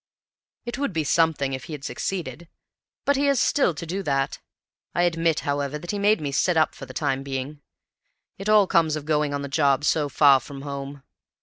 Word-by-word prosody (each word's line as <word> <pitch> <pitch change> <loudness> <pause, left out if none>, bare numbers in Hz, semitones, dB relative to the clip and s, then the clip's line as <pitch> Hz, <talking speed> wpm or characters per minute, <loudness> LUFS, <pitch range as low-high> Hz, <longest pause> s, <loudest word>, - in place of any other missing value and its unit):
"It 240 +2 -5
would 280 -9 -1
be 160 -2 0
something 150 -3 +1
if 130 +2 -5
he 160 - -8
had 145 -2 -7
succeeded; 170 0 -4 0.6
but 285 -1 +3
he 285 - +1
has 280 -3 +3
still 245 - +2
to 170 - -6
do 185 +4 -3
that. 135 -5 -1 0.6
I 175 - +2
admit, 165 -2 +1
however, 145 0 -2
that 175 +3 -6
he 205 - -3
made 210 +2 +3
me 145 -2 -3
sit 170 +5 +1
up 155 - +3
for 135 - -10
the 130 - -10
time 135 -3 -1
being. 135 +2 -5 0.8
It 195 +2 -4
all 210 -2 +6
comes 165 -4 +2
of 150 -2 -6
going 150 -1 +1
on 140 0 -3
the - - -4
job 140 0 +2
so 150 -1 +1
far 140 -1 +5
from 135 +2 -10
home. 140 -1 -6
150 Hz, 210 wpm, -24 LUFS, 140-175 Hz, 0.8 s, all